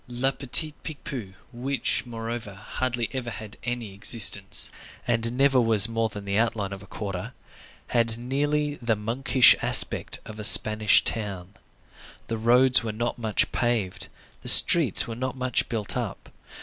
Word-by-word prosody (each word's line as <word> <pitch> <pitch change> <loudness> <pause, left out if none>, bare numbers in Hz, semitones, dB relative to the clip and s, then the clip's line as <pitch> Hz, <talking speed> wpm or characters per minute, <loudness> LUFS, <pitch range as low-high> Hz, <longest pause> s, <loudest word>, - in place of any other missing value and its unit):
Le 125 +2 -1
Petit 145 +3 -2
Picpus, 140 - -7 0.2
which, 130 +1 -2
moreover, 115 -3 -6
hardly 120 +3 -3
ever 130 -2 -4
had 110 -1 -8
any 120 -4 -5
existence, 100 -1 +3 0.3
and 115 +1 0
never 135 -1 +3
was 110 -3 +2
more 115 -1 -2
than 100 -1 -8
the 100 +1 -1
outline 110 -4 -2
of 95 - -9
a - - -14
quarter, 100 -3 -6 0.5
had 115 -1 0
nearly 145 +4 -2
the 115 -2 0
monkish 120 +4 +3
aspect - - +2
of 110 0 -10
a - - -6
Spanish 105 0 +5
town. 100 -4 -4 0.8
The 115 - -3
roads 125 +2 +4
were 110 - -3
not 120 +3 -4
much 110 -3 -1
paved; 105 -6 -2 0.3
the - - 0
streets - - +5
were 115 - -6
not 130 +3 -5
much 130 0 -1
built 110 -4 -4
up. 115 -6 -5
115 Hz, 150 wpm, -25 LUFS, 105-125 Hz, 0.8 s, Spanish